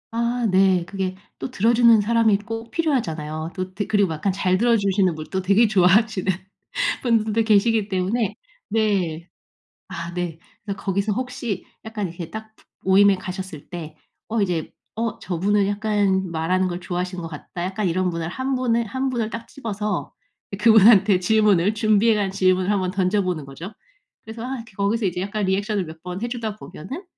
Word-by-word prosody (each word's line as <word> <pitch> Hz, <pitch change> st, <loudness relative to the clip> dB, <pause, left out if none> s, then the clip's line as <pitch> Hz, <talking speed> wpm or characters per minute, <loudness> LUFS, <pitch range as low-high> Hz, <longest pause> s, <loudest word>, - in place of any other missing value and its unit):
아 235 Hz, +1 st, 0 dB
네. 190 Hz, -1 st, +4 dB
그게 190 Hz, 0 st, -3 dB, 0.2 s
또 -, -, -4 dB
들어주는 230 Hz, 0 st, +5 dB
사람이 220 Hz, -1 st, +3 dB
꼭 225 Hz, +2 st, -6 dB
필요하잖아요. 165 Hz, -, -2 dB
또 185 Hz, -1 st, -4 dB
드 205 Hz, +1 st, -3 dB
그리고 200 Hz, -4 st, +2 dB
약간 170 Hz, +5 st, -1 dB
잘 185 Hz, -1 st, +1 dB
들어주시는 200 Hz, -5 st, +2 dB
분도 155 Hz, +5 st, -4 dB
되게 200 Hz, +5 st, +4 dB
좋아하시는 195 Hz, +1 st, +3 dB, 0.7 s
분들도 225 Hz, -2 st, +2 dB
계시기 220 Hz, 0 st, +3 dB
때문에 205 Hz, +3 st, 0 dB, 0.3 s
네. 190 Hz, -6 st, 0 dB, 0.6 s
아 170 Hz, -2 st, -6 dB
네. 175 Hz, -2 st, -4 dB, 0.3 s
그래서 200 Hz, -1 st, -4 dB
거기서 200 Hz, +2 st, -1 dB
혹시 250 Hz, -3 st, -4 dB, 0.2 s
약간 215 Hz, -3 st, -3 dB
이렇게 170 Hz, -1 st, -8 dB
딱 220 Hz, +3 st, -8 dB, 0.3 s
모임에 195 Hz, +1 st, +5 dB
가셨을 185 Hz, -4 st, -7 dB
때 160 Hz, -4 st, -7 dB, 0.3 s
어 225 Hz, 0 st, 0 dB
이제 175 Hz, -5 st, -1 dB, 0.2 s
'어 230 Hz, -1 st, -2 dB
저분은 195 Hz, +3 st, 0 dB
약간 200 Hz, -3 st, 0 dB
말하는 175 Hz, +3 st, 0 dB
걸 175 Hz, 0 st, -4 dB
좋아하시는 180 Hz, +1 st, -3 dB
것 165 Hz, -, -5 dB
같다.' 160 Hz, +2 st, -7 dB
약간 190 Hz, +2 st, -2 dB
이런 185 Hz, +2 st, 0 dB
분을 165 Hz, -1 st, -3 dB
1 260 Hz, +9 st, -2 dB
분을 235 Hz, -2 st, +1 dB
1 260 Hz, +4 st, -2 dB
분을 235 Hz, -4 st, -1 dB
딱 225 Hz, +1 st, -7 dB
집어서 210 Hz, -, -4 dB, 0.5 s
그분한테 210 Hz, -3 st, +6 dB
질문을 205 Hz, -1 st, +3 dB
준비해 215 Hz, +1 st, +3 dB
간 205 Hz, -2 st, 0 dB
질문을 185 Hz, 0 st, +2 dB
한번 190 Hz, -3 st, +1 dB
던져보는 185 Hz, -4 st, 0 dB
거죠. 165 Hz, +10 st, -9 dB, 0.5 s
그래서 225 Hz, +1 st, -8 dB
아 255 Hz, -1 st, -4 dB
거기서 205 Hz, +3 st, 0 dB
이제 180 Hz, -1 st, -2 dB
약간 205 Hz, +2 st, -2 dB
리액션을 200 Hz, +1 st, 0 dB
몇 160 Hz, 0 st, -11 dB
번 180 Hz, +3 st, -6 dB
해주다 235 Hz, -3 st, -3 dB
보면은 260 Hz, -, -8 dB
200 Hz, 340 characters per minute, -22 LUFS, 185-220 Hz, 0.7 s, 그분한테